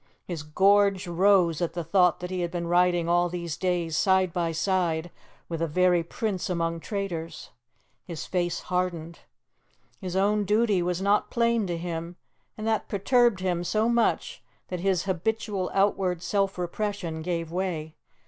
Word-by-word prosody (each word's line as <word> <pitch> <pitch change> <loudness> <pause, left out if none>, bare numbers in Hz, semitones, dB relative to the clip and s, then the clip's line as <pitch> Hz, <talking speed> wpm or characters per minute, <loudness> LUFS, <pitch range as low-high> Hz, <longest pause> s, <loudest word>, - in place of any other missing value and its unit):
His 170 -4 -5
gorge 195 +5 +3
rose 175 -2 +3
at 170 -1 -1
the 170 0 -3
thought 180 +1 +3
that 180 +1 -5
he 185 - -2
had 175 - -1
been 170 0 -4
riding 175 0 +2
all 175 +1 +2
these 170 -2 -4
days 175 -3 -1
side 190 0 +2
by 170 -2 0
side 170 -1 0 0.4
with 165 -1 -4
a 165 - +1
very 180 +2 +3
prince 190 +3 -3
among 165 -1 -1
traitors. 170 -5 -5 0.5
His 170 -4 -6
face 175 -2 -1
hardened. 175 -2 -3 0.8
His 185 -1 -5
own 205 +2 +2
duty 210 -2 +2
was 180 +1 -1
not 205 +1 +2
plain 235 -3 +1
to 175 -1 -2
him, 170 0 -5 0.4
and 215 - -5
that 220 -1 0
perturbed 235 0 +2
him 175 -2 -1
so 215 +5 +1
much 235 -1 0 0.3
that 180 - -3
his 185 -1 +1
habitual 195 +1 -2
outward 190 -3 +1
self 195 -2 0
repression 180 -2 -3
gave 165 -1 -3
way. 170 -4 -3
180 Hz, 160 wpm, -26 LUFS, 170-195 Hz, 0.8 s, gorge